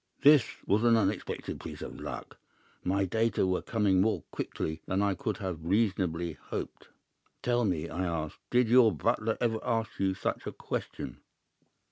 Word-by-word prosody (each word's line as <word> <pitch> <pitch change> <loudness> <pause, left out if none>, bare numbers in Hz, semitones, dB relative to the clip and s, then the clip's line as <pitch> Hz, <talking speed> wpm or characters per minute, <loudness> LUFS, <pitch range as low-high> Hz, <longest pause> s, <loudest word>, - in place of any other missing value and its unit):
"This 145 -4 +7 0.2
was 105 +3 +2
an 115 -1 +6
unexpected 110 - -1
piece - - -7
of - - -7
luck. - - -7 0.4
My 95 +2 +1
data 110 +1 +1
were 95 0 +1
coming 100 -5 +2
more 110 +3 +1
quickly 80 +1 -3
than 95 - 0
I 100 -1 +2
could 110 -4 -3
have 90 -6 -4
reasonably 90 -3 +1
hoped. - - -6 0.6
"'Tell 120 -1 +2
me,' 85 -5 0
I 85 +3 -3
asked, 80 -3 -3
'did 125 -1 +4
your 120 -1 +7
butler 105 +7 0
ever 115 -2 +1
ask 115 -3 -1
you 95 -1 +1
such - - -3
a - - -2
question? - - -5
100 Hz, 160 wpm, -30 LUFS, 90-115 Hz, 0.6 s, This